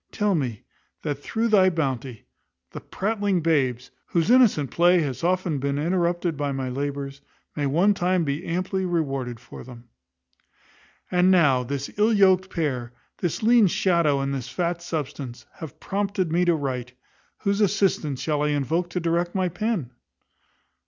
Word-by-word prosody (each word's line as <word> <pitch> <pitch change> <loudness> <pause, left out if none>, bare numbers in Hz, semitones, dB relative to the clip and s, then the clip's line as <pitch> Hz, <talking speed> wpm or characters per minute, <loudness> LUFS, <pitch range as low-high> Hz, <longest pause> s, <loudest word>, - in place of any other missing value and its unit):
Tell 210 -2 +1
me, 125 - -2 0.4
that 145 -1 -3
through 230 +8 -1
thy 190 -3 +5
bounty, 135 - -3 0.5
the - - -8
pratling 200 -3 -1
babes, 130 -7 0 0.2
whose 170 +5 +1
innocent 210 - +4
play 175 +1 +4
hath 140 -1 -4
often 180 -4 0
been 140 +1 -1
interrupted 175 +1 0
by 145 0 -2
my 135 -1 -3
labours, 140 +1 -4 0.3
may 145 -2 -1
one 175 +9 +3
time 180 -2 +1
be 145 +2 -2
amply 185 +2 -2
rewarded 135 -9 -2
for 125 - -11
them. 120 -1 -13 1.2
And 180 +1 +4
now, 150 -9 +4
this 140 +2 -4
ill 215 +2 +4
yoked 190 -2 +4
pair, 130 -9 -3 0.3
this 175 +3 -2
lean 230 -2 +5
shadow 170 -6 +2
and 135 0 -2
this 130 -3 -4
fat 170 -1 -2
substance, 140 -6 -5
have 160 -5 -9
prompted 195 -3 -2
me 175 +2 +2
to 175 -1 +3
write, 130 -4 -4 0.4
whose 200 0 -1
assistance 185 -9 +1
shall 150 -2 -1
I 150 - +1
invoke 150 +4 0
to 180 - -2
direct 170 +1 -1
my 185 -1 +1
pen? 180 - -2
165 Hz, 155 wpm, -24 LUFS, 140-185 Hz, 1.2 s, thy